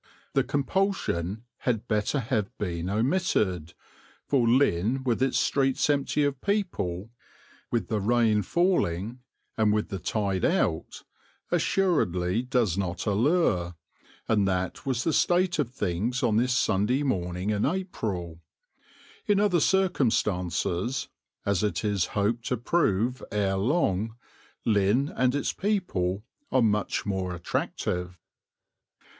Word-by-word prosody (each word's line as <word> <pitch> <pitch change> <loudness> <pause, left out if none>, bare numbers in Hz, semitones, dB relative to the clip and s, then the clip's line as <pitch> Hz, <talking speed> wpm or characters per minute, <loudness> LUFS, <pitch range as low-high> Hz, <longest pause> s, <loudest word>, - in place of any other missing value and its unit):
The 135 - +3
compulsion 135 - -1
had 120 -2 -2
better 105 +6 0
have 110 -5 -1
been 90 -3 -3
omitted, 105 - 0 0.5
for 130 -5 +2
Lynn 120 0 +2
with 125 -2 0
its 135 -1 +2
streets 135 -2 +2
empty 145 +1 +1
of 140 -2 -1
people, 115 - -2 0.6
with 120 - -1
the 110 - -1
rain 110 0 +3
falling, 120 - 0 0.4
and 110 -1 +4
with 105 0 0
the 95 - -4
tide 100 -1 -1
out, 80 - 0 0.5
assuredly 100 - +1
does 120 - 0
not 90 -2 -3
allure, 105 - +1 0.5
and 105 -3 +2
that 95 +7 -2
was 130 -2 0
the 165 - +1
state 175 0 +2
of 140 -6 +1
things 120 +3 -2
on 110 -3 +3
this 125 +1 +2
Sunday 110 +7 +1
morning 90 -5 -1
in 105 -1 0
April. 105 - -3 0.9
In 205 -1 +3
other 200 -4 +3
circumstances, 110 - +1 0.4
as 100 -3 +1
it 105 +1 -1
is 100 -3 +1
hoped 115 +4 0
to 125 - 0
prove 120 - +1
ere 100 -2 +1
long, 110 - 0 0.5
Lynn 110 +6 +2
and 130 +1 +2
its 145 - -1
people 110 - -1 0.3
are 130 - +4
much 105 -1 0
more 95 -3 -2
attractive. 90 +1 -3
110 Hz, 125 wpm, -27 LUFS, 95-135 Hz, 0.9 s, and